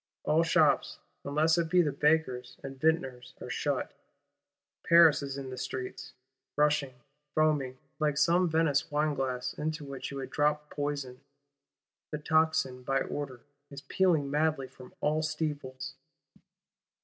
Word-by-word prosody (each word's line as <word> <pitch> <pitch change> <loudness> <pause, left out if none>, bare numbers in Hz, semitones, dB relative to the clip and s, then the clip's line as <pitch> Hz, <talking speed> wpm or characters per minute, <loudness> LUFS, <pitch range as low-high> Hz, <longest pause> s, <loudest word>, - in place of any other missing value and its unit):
All 155 +2 +3
shops, 165 0 +2 0.3
unless 155 +4 +2
it 165 -1 -1
be 180 +1 +5
the 150 - 0
Bakers' 130 -5 0
and 135 -1 -8
Vintners', 135 -6 0
are - - -7
shut: - - -2 0.9
Paris 170 -3 +6
is 140 -1 -5
in 135 -1 -6
the 130 - -6
streets;—rushing, 130 +2 -3 0.4
foaming 150 -5 +1 0.2
like 150 -2 +1
some 170 +4 +3
Venice 160 -3 +1
wine 150 +1 +1
glass 130 -2 -2
into 155 0 -4
which 140 -1 -6
you 140 - -6
had 135 - -6
dropped 150 0 0
poison. 145 -3 -4 0.9
The 150 - -3
tocsin, 155 -4 +1
by 135 +1 0
order, 135 -4 -5 0.3
is 140 0 -10
pealing 155 -2 +1
madly 150 -2 +1
from 130 -1 -14
all 155 +1 +1
steeples. 145 -5 -4
145 Hz, 135 wpm, -30 LUFS, 135-155 Hz, 0.9 s, Paris